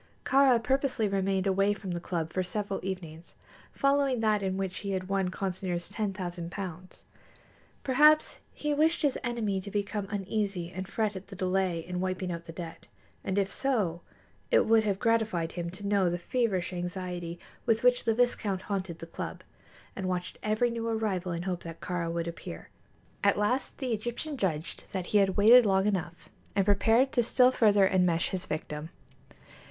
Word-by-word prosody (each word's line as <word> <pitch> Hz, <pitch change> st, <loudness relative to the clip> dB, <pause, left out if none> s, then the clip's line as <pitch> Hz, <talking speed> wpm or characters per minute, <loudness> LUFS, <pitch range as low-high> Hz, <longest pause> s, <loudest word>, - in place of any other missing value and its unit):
Kāra 270 Hz, -2 st, +5 dB
purposely 265 Hz, -4 st, +1 dB
remained 195 Hz, -1 st, 0 dB
away 195 Hz, +1 st, +3 dB
from 195 Hz, -2 st, -6 dB
the 175 Hz, -, -2 dB
club 165 Hz, -2 st, -3 dB
for 185 Hz, -, +1 dB
several 195 Hz, +2 st, -3 dB
evenings 170 Hz, -3 st, -6 dB, 0.4 s
following 275 Hz, -2 st, +2 dB
that 215 Hz, -2 st, +2 dB
in 190 Hz, -1 st, -1 dB
which 190 Hz, -1 st, -3 dB
he 200 Hz, -1 st, -3 dB
had 185 Hz, -1 st, -2 dB
won 195 Hz, -2 st, +1 dB
Consinor's 180 Hz, -2 st, -3 dB
ten 210 Hz, -3 st, -2 dB
thousand 175 Hz, -3 st, -5 dB
pounds. 185 Hz, -1 st, -7 dB, 0.8 s
Perhaps 300 Hz, +4 st, +4 dB
he 300 Hz, 0 st, -2 dB
wished 315 Hz, +3 st, +2 dB
his 285 Hz, -3 st, +2 dB
enemy 220 Hz, -6 st, -1 dB
to 200 Hz, -, -8 dB
become 205 Hz, 0 st, -2 dB
uneasy 200 Hz, -3 st, -2 dB
and 185 Hz, +1 st, -5 dB
fret 215 Hz, 0 st, -1 dB
at 190 Hz, +1 st, -8 dB
the 200 Hz, -, -10 dB
delay 185 Hz, -2 st, 0 dB
in 180 Hz, 0 st, -4 dB
wiping 185 Hz, 0 st, -2 dB
out 170 Hz, 0 st, -5 dB
the 165 Hz, -, -8 dB
debt, 165 Hz, 0 st, -8 dB, 0.4 s
and 190 Hz, -, -2 dB
if 195 Hz, -1 st, +1 dB
so, 205 Hz, -12 st, 0 dB, 0.5 s
it -, -, +4 dB
would 225 Hz, 0 st, +5 dB
have 200 Hz, -2 st, +1 dB
gratified 220 Hz, -7 st, +1 dB
him 170 Hz, -1 st, -4 dB
to 185 Hz, +3 st, -9 dB
know 200 Hz, -3 st, +3 dB
the 175 Hz, -, -1 dB
feverish 190 Hz, -2 st, -1 dB
anxiety 175 Hz, -1 st, -4 dB, 0.3 s
with 225 Hz, 0 st, +2 dB
which 250 Hz, 0 st, +4 dB
the 225 Hz, -1 st, +1 dB
viscount 215 Hz, -6 st, +1 dB
haunted 190 Hz, -4 st, -3 dB
the 165 Hz, -, -8 dB
club, 165 Hz, -, -6 dB, 0.5 s
and 190 Hz, -1 st, -3 dB
watched 180 Hz, -1 st, -3 dB
every 215 Hz, +3 st, +1 dB
new 230 Hz, 0 st, -3 dB
arrival 200 Hz, -5 st, -1 dB
in 170 Hz, 0 st, -2 dB
the -, -, -7 dB
hope 180 Hz, -2 st, -2 dB
that 165 Hz, -1 st, -8 dB
Kāra 170 Hz, -2 st, -2 dB
would 170 Hz, 0 st, -2 dB
appear. 125 Hz, -, -7 dB, 0.5 s
At 200 Hz, 0 st, +4 dB
last 245 Hz, +5 st, 0 dB
the 255 Hz, -4 st, -2 dB
Egyptian 240 Hz, +7 st, -3 dB
judged 170 Hz, -, -3 dB
that 185 Hz, -2 st, -2 dB
he 210 Hz, -, +6 dB
had 195 Hz, -1 st, +2 dB
waited 235 Hz, +5 st, +8 dB
long 190 Hz, -2 st, +2 dB
enough, 180 Hz, -4 st, -2 dB, 0.3 s
and 195 Hz, -1 st, +3 dB
prepared 225 Hz, +6 st, +4 dB
to 245 Hz, -, +3 dB
still 250 Hz, +2 st, +4 dB
further 205 Hz, -5 st, +4 dB
enmesh 180 Hz, -3 st, +2 dB
his 185 Hz, -1 st, -4 dB
victim. 155 Hz, 0 st, -4 dB
195 Hz, 180 wpm, -29 LUFS, 180-220 Hz, 0.8 s, waited